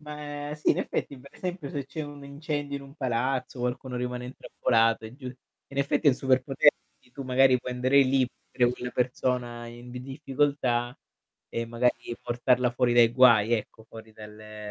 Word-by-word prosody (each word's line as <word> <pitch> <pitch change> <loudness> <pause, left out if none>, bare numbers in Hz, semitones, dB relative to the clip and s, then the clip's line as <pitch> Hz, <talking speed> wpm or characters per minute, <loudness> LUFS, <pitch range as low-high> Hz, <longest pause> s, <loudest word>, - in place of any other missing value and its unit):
Ma 150 -1 -6
sì, 150 - +1
in - - +2
effetti 140 - -3
per 140 +2 -15
esempio 180 -6 -5
se 140 -2 -4
c'è 155 +3 -5
un 145 -1 -9
incendio 145 0 -4
in 140 - -8
un 140 0 -14
palazzo, 130 -1 -2
qualcuno 125 +1 -3
rimane 125 0 -3
intrappolato 115 -3 +1
è 110 +3 -9
giù 130 -2 -10
in 130 +2 -11
effetti 145 +2 +2
il 135 - +5
superpotere 135 +2 +4 0.4
tu 140 - -7
magari 130 0 +4
puoi 125 - -5
andare 130 +3 +3
lì 130 -1 +2
per 125 - -8
aiutare 120 - +5
quella 125 0 -6
persona 125 -1 -1
in 120 +1 -11
difficoltà 130 -2 -1 0.5
e 115 0 -3
magari 120 0 -1
portarla 125 0 +1
fuori 120 0 +1
dai 120 -1 +6
guai, 120 -3 +6
ecco, 110 0 -3
fuori 110 -1 -12
dalle 105 0 -10
125 Hz, 170 wpm, -27 LUFS, 120-140 Hz, 0.5 s, dai